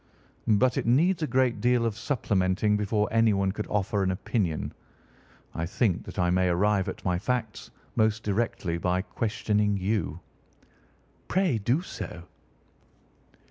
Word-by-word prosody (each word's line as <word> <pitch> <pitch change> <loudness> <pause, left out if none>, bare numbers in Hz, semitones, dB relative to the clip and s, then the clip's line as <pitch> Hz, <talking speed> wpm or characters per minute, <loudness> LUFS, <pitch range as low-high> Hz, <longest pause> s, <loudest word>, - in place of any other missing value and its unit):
"But 115 +4 +3
it - - -4
needs 165 +9 +3
a 155 - 0
great 130 -5 +1
deal 120 0 +3
of 115 -3 -1
supplementing 105 -5 +1
before 105 0 +1
anyone 105 -4 +3
could 105 +2 -5
offer 100 0 0
an 95 - +1
opinion. 95 -3 -2 0.8
I 85 - -3
think 100 -1 0
that - - -9
I 90 -2 +2
may 90 0 +2
arrive 95 +2 +2
at - - -8
my 90 -1 +1
facts 115 0 -3 0.3
most 110 0 +2
directly 100 -5 -1
by 90 +1 0
questioning 105 -1 0
you." 100 0 -1 1.1
"Pray 180 - +1
do 125 - +1
so." 95 - -7
105 Hz, 140 wpm, -27 LUFS, 95-115 Hz, 1.1 s, But